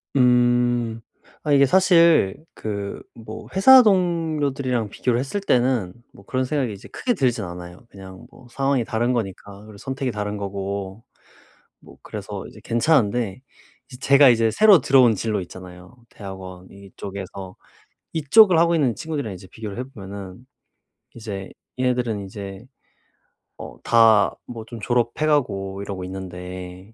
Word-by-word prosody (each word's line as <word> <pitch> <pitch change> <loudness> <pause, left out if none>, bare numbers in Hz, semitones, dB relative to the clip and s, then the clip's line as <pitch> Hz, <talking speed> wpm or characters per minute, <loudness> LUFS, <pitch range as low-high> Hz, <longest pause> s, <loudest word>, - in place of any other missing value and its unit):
음. 120 -2 +2 0.4
아 150 - -1
이게 140 -1 +6
사실 170 - +4 0.2
그 100 -2 -5
뭐 110 -1 -10
회사 260 +7 +8
동료들이랑 155 - 0
비교를 120 +3 -1
했을 140 +10 -3
때는 125 - +1 0.2
뭐 100 - -17
그런 130 +3 -1
생각이 130 -5 -1
이제 100 - -12
크게 245 - -1
들진 125 - 0
않아요. 90 +1 -9
그냥 95 -1 -12
뭐 125 - -18
상황이 135 -1 0
다른 120 +3 0
거니까, 100 -2 -5
그리고 105 -2 -13
선택이 135 +2 -4
다른 105 -1 -4
거고. 100 +1 -5 0.8
뭐 - - -15
그래서 - - -7
이제 - - -14
괜찮은데 115 -5 +1 0.5
이 125 - -10
제가 140 +1 +6
이제 115 -2 +3
새로 205 - +6
들어온 130 -4 +5
진로 105 0 -2
있잖아요. 90 +4 -12
대학원 95 -2 -10
이쪽에서 100 -1 -9 0.6
이쪽을 175 +5 +5
하고 170 +1 +3
있는 140 -8 +1
친구들이랑 145 - -4
이제 95 +1 -12
비교를 110 -1 -8
해 125 - -3
보면은 100 -4 -10 0.7
이제 100 -4 -7 0.3
얘네들은 125 -5 -1
이제 95 +1 -9 0.9
어 - - -10
다 110 -3 +4
뭐 115 -2 -8
좀 115 0 -9
졸업해 120 +5 0
가고 100 -10 -1
이러고 100 -2 -6
있는데 90 +1 -8
115 Hz, 300 characters per minute, -22 LUFS, 100-135 Hz, 0.9 s, 회사